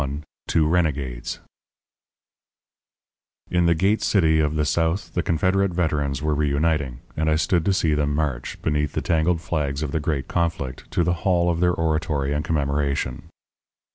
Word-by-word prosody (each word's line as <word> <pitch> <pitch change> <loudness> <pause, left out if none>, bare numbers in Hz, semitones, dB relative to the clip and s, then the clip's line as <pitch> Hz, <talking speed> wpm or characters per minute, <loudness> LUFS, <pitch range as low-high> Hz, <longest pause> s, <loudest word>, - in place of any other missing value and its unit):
XXI 70 +2 -3 0.3
TWO 80 -2 +2
RENEGADES 70 -8 -1 2.1
In 90 -1 +3
the 85 - +4
Gate 95 +6 +2
City 80 -6 +3
of 75 0 +1
the 75 -1 +1
South 80 +5 0
the 85 - +1
Confederate 95 +3 +1
Veterans 75 -5 0
were 75 0 +1
reuniting; 75 -3 0
and 80 0 0
I 80 - +3
stood 85 +1 +1
to 100 - +3
see 85 -5 +2
them 75 -1 0
march, 70 -5 -2
beneath 75 -1 0
the - - -1
tangled 80 +1 +1
flags 75 -3 -2
of 75 - -3
the 80 - 0
great 75 -3 -2
conflict, 80 -7 -2
to 85 - +1
the 85 +1 +1
hall 85 -2 +2
of 85 - -2
their 90 0 +3
oratory 75 -4 0
and 75 +1 -1
commemoration. 70 -4 -1
80 Hz, 165 wpm, -23 LUFS, 70-85 Hz, 2.1 s, the